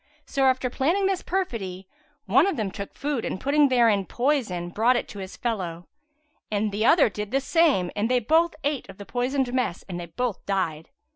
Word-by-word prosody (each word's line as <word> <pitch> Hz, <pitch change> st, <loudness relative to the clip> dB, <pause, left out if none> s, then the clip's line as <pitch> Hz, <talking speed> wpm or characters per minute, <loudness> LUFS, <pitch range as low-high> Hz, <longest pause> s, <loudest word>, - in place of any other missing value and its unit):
So 270 Hz, -1 st, 0 dB
after 260 Hz, -1 st, +2 dB
planning 335 Hz, +11 st, +1 dB
this 385 Hz, -1 st, 0 dB
perfidy, 195 Hz, -, -3 dB, 0.4 s
one 260 Hz, -, +4 dB
of 390 Hz, -, -1 dB
them 210 Hz, -4 st, -2 dB
took 200 Hz, 0 st, -7 dB
food 285 Hz, -4 st, -2 dB
and -, -, -3 dB
putting 285 Hz, +3 st, +3 dB
therein 230 Hz, -6 st, +3 dB
poison, 240 Hz, -10 st, 0 dB
brought 230 Hz, +7 st, +3 dB
it -, -, -1 dB
to 205 Hz, -, -8 dB
his 190 Hz, 0 st, -8 dB
fellow; 180 Hz, -8 st, -3 dB, 0.6 s
the 210 Hz, 0 st, -1 dB
other 315 Hz, +6 st, +6 dB
did 210 Hz, -1 st, -5 dB
the 270 Hz, +4 st, +1 dB
same 275 Hz, -, +2 dB
and 210 Hz, +3 st, 0 dB
they 250 Hz, -, +3 dB
both 320 Hz, +8 st, +2 dB
ate 285 Hz, -2 st, -2 dB
of -, -, -11 dB
the 200 Hz, -, -9 dB
poisoned 250 Hz, +2 st, -1 dB
mess 250 Hz, -9 st, -1 dB
and 180 Hz, -2 st, -5 dB
they 170 Hz, -, -6 dB
both 225 Hz, +5 st, -3 dB
died. 165 Hz, -6 st, -1 dB
235 Hz, 195 wpm, -25 LUFS, 195-275 Hz, 0.6 s, other